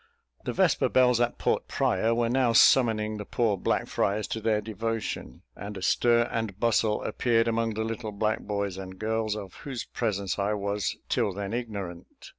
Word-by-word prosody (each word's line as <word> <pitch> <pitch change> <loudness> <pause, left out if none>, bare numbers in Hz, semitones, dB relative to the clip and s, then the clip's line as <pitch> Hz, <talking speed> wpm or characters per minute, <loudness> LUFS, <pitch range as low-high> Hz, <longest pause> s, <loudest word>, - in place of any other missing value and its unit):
The - - -2
vesper - - +2
bells 125 -2 +4
at 120 0 0
Port - - 0
Praya 115 +1 +1
were 120 0 +1
now 125 -1 +2
summoning 110 -3 +4
the 105 - -5
poor 110 0 0
black 95 - 0
friars 100 0 0
to 110 - -3
their 110 -1 +2
devotion; 110 - -4
and 100 +1 -7
a 95 - -7
stir 120 +2 +3
and 110 -4 -3
bustle 110 -2 +2
appeared 115 -2 +1
among 115 -1 0
the 110 - -1
little 110 0 -4
black 105 +1 0
boys 100 -2 -3
and 95 -1 -8
girls, 110 0 -1
of 100 -4 -7
whose 135 -4 -5
presence 100 -5 -2
I 100 +2 +1
was 100 -1 -2
till 100 - 0
then 100 +2 -4
ignorant. 100 -7 -6
110 Hz, 180 wpm, -27 LUFS, 100-115 Hz, -, bells